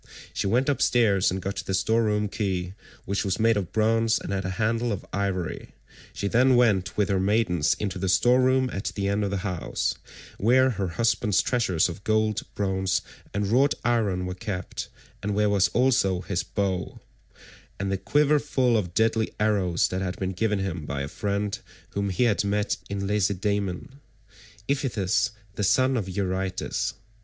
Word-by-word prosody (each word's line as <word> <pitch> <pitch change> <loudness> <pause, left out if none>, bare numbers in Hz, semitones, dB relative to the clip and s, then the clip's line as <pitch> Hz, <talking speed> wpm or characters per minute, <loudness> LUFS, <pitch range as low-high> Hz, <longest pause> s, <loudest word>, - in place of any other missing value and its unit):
She - - -1
went 125 +6 +2
upstairs 115 -8 +3
and 95 +1 -3
got 100 +1 -3
the 95 - -2
store 110 +5 +2
room 105 -1 +1
key, 95 -3 -2 0.3
which 100 +1 -1
was 95 -2 -1
made 115 +1 +4
of 95 -5 -2
bronze 115 +1 +2
and - - -5
had 95 -1 -2
a - - -1
handle 115 +2 0
of 100 - -4
ivory; 95 -3 -3 0.4
she 100 - -3
then 125 +4 +4
went 100 -5 +2
with 105 -3 +2
her 95 -1 +2
maidens 95 -6 +2
into 95 -3 -4
the 95 0 -1
store 125 +7 +4
room 130 0 +3
at 95 - -4
the 100 -1 -1
end 100 +1 0
of 100 - 0
the 100 - -1
house, 90 -4 -2 0.5
where 130 +5 +4
her 100 -4 -2
husband's 105 +2 +1
treasures 105 -10 +1
of 90 +3 -8
gold, 110 0 +1
bronze, 95 -2 0 0.3
and 100 +1 -1
wrought 135 +6 +3
iron 105 -6 +1
were 90 - -3
kept, 95 0 -5 0.3
and 105 0 -2
where 105 0 +2
was 100 -2 +4
also 120 -8 +2
his 95 -2 -2
bow, 95 -1 -3 0.8
and 95 0 -2
the 95 - 0
quiver 150 +4 +3
full 130 -4 +1
of 90 -5 -3
deadly 110 0 +2
arrows 100 -5 +2
that 95 +1 -2
had 90 -1 -3
been 95 -1 -2
given 105 +3 0
him 95 -4 -3
by 70 -1 -3
a - - -4
friend 100 +4 -2 0.3
whom 100 0 -1
he 95 +6 +1
had 110 -4 +2
met 100 +1 0
in 100 -1 -3
Lacedaemon—Iphitus 105 +3 -2 0.2
the 105 - -3
son 130 +7 +3
of 105 -6 -2
Eurytus. 95 0 -2
100 Hz, 175 wpm, -26 LUFS, 95-115 Hz, 0.8 s, made